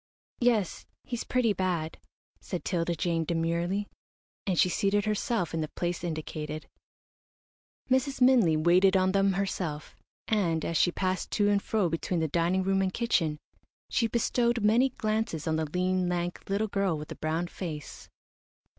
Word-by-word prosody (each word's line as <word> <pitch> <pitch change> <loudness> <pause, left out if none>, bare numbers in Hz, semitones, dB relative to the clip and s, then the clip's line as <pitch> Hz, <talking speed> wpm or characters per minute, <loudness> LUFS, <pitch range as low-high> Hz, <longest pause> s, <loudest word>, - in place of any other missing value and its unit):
"Yes, 230 -7 +1 0.2
he's 240 -2 -4
pretty 245 -4 +1
bad," 175 -4 -2 0.4
said 180 - -5
'Tilda 170 -1 0
Jane, 165 0 0
demurely; 170 +5 -1 0.6
and 185 -3 +1
she - - +6
seated 200 +3 +1
herself 215 -3 -1
in 165 - -1
the 155 - -2
place 175 +2 -3
indicated. 155 -2 -5 1.2
Mrs. 260 +1 +1
Minley 245 -11 +5
waited 180 +4 +4
on 185 0 +2
them 195 0 +3
herself, 180 -6 -3 0.3
and, 170 -7 +1
as 165 - -2
she 175 - +4
passed 185 +1 -2
to 205 -1 +3
and 200 -1 +2
fro 210 -4 +1
between 165 +2 -1
the 160 - +1
dining 170 +4 +1
room 195 0 +2
and 190 -1 0
kitchen, 175 -9 0 0.5
she 230 -3 +2
bestowed 235 0 +1
many 235 +5 +4
glances 215 - -2
on 160 - 0
the 160 - 0
lean, 185 +1 0
lank, 175 0 -2
little 205 +2 +1
girl 195 -5 0
with 150 0 -8
the - - -6
brown 160 +2 -1
face. 160 -4 -7
185 Hz, 155 wpm, -29 LUFS, 165-205 Hz, 1.2 s, she